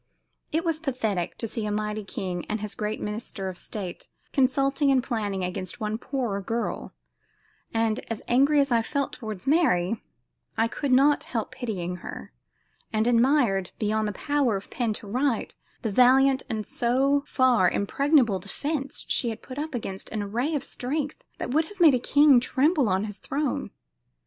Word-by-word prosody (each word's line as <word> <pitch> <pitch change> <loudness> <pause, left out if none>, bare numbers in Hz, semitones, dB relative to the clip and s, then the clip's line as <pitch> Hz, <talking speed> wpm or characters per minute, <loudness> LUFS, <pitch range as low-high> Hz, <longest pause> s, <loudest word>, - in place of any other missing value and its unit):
It 325 +3 0
was 325 -2 0
pathetic 225 - -2
to 230 - -3
see 225 +1 -4
a - - -2
mighty 210 0 -2
king 185 -3 -4
and 215 - -1
his 210 -1 -4
great 215 0 -3
minister 210 -2 -4
of 185 - -7
state 190 -5 -6 0.3
consulting 275 +2 +2
and 265 -2 +3
planning 205 -7 -2
against 185 +4 -4
one 215 0 -2
poor 235 -8 -2
girl; 230 +4 -3 0.8
and, 225 -1 +1
as 225 -2 -4
angry 280 +4 +4
as 275 -1 +2
I 230 -1 +4
felt 280 +4 -2
toward 215 -5 -6
Mary, 230 - +2 0.6
I 225 - +3
could 275 +3 -3
not 280 +3 +4
help 230 -1 -3
pitying 200 -9 -4
her, 170 - -9 0.6
and 215 0 +1
admired, 235 -6 +3
beyond 215 0 0
the - - -1
power 280 -3 +1
of 195 - -11
pen 235 -3 0
to 210 - -9
write, 250 +2 0 0.3
the 220 - -1
valiant 260 +4 +5
and 215 -2 -2
so 270 +4 +2
far 245 -8 +4
impregnable 245 - +2
defense 275 - -4
she 240 - +1
had 225 - -6
put 260 +2 -7
up 305 -2 -4
against 195 -5 -4
an 215 -2 -3
array 240 +10 -1
of 285 - -1
strength 285 +3 -3 0.2
that - - -4
would 310 +4 +3
have 410 +3 -14
made 325 -5 +7
a 250 - +3
king 285 +1 +6
tremble 275 - +2
on 190 +2 +1
his 210 -1 -6
throne. 285 0 -2
240 Hz, 175 wpm, -26 LUFS, 210-275 Hz, 0.8 s, made